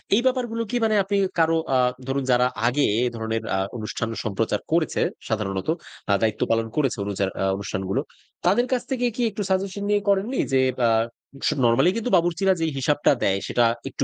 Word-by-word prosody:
এই 235 - +3
ব্যাপারগুলো 245 -3 0
কি - - -2
মানে 215 -1 +2
আপনি 200 +1 -1 0.2
কারো 165 0 +4 0.2
আ - - +5 0.3
ধরুন 135 0 -1
যারা 125 0 +4 0.2
আগে 140 +4 +2 0.2
এই 125 - +2
ধরনের 110 0 -2
আ - - +1 0.2
অনুষ্ঠান 110 +1 -3
সম্প্রচার 105 0 -1
করেছে 165 -1 +1 0.3
সাধারণত, 95 -2 -2 0.4
আ - - +5
দায়িত্ব 110 -1 0
পালন 115 0 +1
করেছে 135 -6 +1
অনুজার 100 -1 -1
আ - - +2
অনুষ্ঠানগুলো। 95 -1 -2 0.4
তাদের 210 +8 +4
কাছ 250 -2 +1
থেকে 250 -1 0
কি 245 - -2
একটু 210 0 -6
সাজেশন 195 +1 -1
দিয়ে 205 0 +2
করেননি? 200 +7 +1
যে 130 - +5 0.2
ব্যা 120 -1 +3 0.6
স - - +4 0.2
নরমালি 130 +9 +4
কিন্তু 230 +2 -2
বাবুর্চিরা 175 +3 +2
যেই 160 -1 +1
হিসাবটা 145 +2 +2
দেয়, 95 0 +2
সেটা 120 - +2 0.3
একটু - - -3
145 Hz, 185 wpm, -24 LUFS, -, 0.6 s, আ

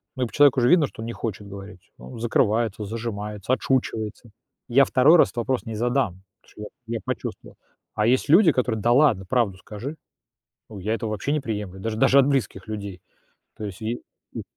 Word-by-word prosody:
ну, 130 - -1
и - - +2
по - - -17
человеку 140 -3 +5
же 120 - +4
видно, 160 -4 +5
что 110 - -11
он - - -5
не 115 - -4
хочет 105 -2 -5
говорить. 100 -1 -11
Он 65 - -11
закрывается, 110 -2 0
зажимается, 105 -1 -5
отшучивается. 115 -4 -2 0.4
Я 135 +3 +5
2 145 +7 +5
раз - - +6
этот - - -18
вопрос 125 +2 -1
не 115 - -5
задам, 120 -5 -1 0.2
потому - - -24
что - - -13 0.3
я 115 - -3
я - - -2
почувствовал. - - -6 0.4
А 105 +1 +1
есть 130 +3 +2
люди, 170 -1 +6
которые: 120 -4 -1
"Да 120 +2 +3
ладно, 125 -9 +3
правду 115 -7 +1
скажи". 120 +11 -8 0.7
Ну, 105 - -8
я 105 +4 -2
этого 115 -1 -3
вообще 110 +7 -2
не 150 - +1
приемлю, 105 -6 -5
даже 110 +1 -3
даже 140 +4 +5
от 135 - +2
близких 110 -7 -2
людей. 100 -4 -6 0.5
То - - -10
есть 100 -1 -7
и 115 +2 -3 0.4
и - - -4
115 Hz, 205 wpm, -24 LUFS, 105-130 Hz, 0.7 s, раз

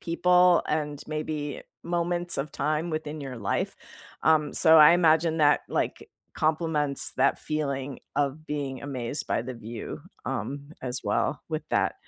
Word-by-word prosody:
people 180 +1 +4
and 150 -2 -2
maybe 155 -2 -4 0.2
moments 175 +1 0
of 140 +1 -3
time 155 +4 -1
within 155 -1 -4
your 135 -3 -6
life, 100 -3 -2 0.5
um, 155 -2 +3
so 160 0 +6
I 150 +2 +9
imagine 160 -1 +3
that, 145 -1 +4
like, - - -2 0.3
compliments 155 -3 +1
that 135 +2 +3
feeling 140 -3 -3 0.2
of 145 +2 -1
being 140 -3 -4
amazed 135 0 -3
by - - 0
the 130 +1 -6
view, 115 0 -7 0.2
um, 140 +2 -4
as 125 -1 -3
well - - 0
with 155 -1 -3
that. - - +1
150 Hz, 145 wpm, -27 LUFS, 140-160 Hz, 0.5 s, I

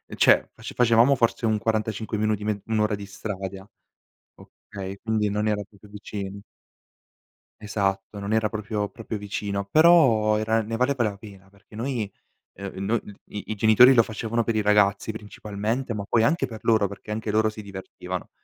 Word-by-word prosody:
cioè, - - +4
face - - -8
facevamo 120 +2 +5
forse 115 -1 +1
un 110 -1 +2
45 110 0 -1
minuti, 105 -1 0
me 105 -1 -2
1 110 -1 0
ora 105 0 +2
di 100 0 -8
strada, 95 -1 -6 0.7
okay, 95 -1 -9
quindi 110 -2 +1
non 105 +1 0
era 105 -1 0
proprio 100 +1 -19
vicino. 100 -1 -7 1.2
Esatto, 100 -1 -2
non 100 +1 -4
era 110 0 +2
proprio- 105 -1 -3
proprio 110 0 -6
vicino, 100 -1 -3
però 120 - +5
era 110 +1 +1
ne 115 +1 -4
valeva 125 0 +1
la 105 -3 -2
pena 100 -2 -14
perché 100 +2 -19
noi, 115 -3 -2 0.4
ehm, 100 0 -6
no 115 +4 +2
d 105 - -12
i 105 +1 -7
i - - -2
genitori 110 +5 +7
lo 115 - +6
facevano 115 +1 -2
per 115 - 0
i 110 - +2
ragazzi, 105 +1 +3
principalmente, 110 +3 -4
ma 100 -1 -4
poi 115 - +3
anche 135 +4 +2
per 110 -3 -9
loro, 110 -3 +3
perché 100 +2 -9
anche 110 0 -2
loro 110 0 +3
si 110 0 -8
divertivano. 95 -2 -7
105 Hz, 175 wpm, -25 LUFS, 100-110 Hz, 1.2 s, genitori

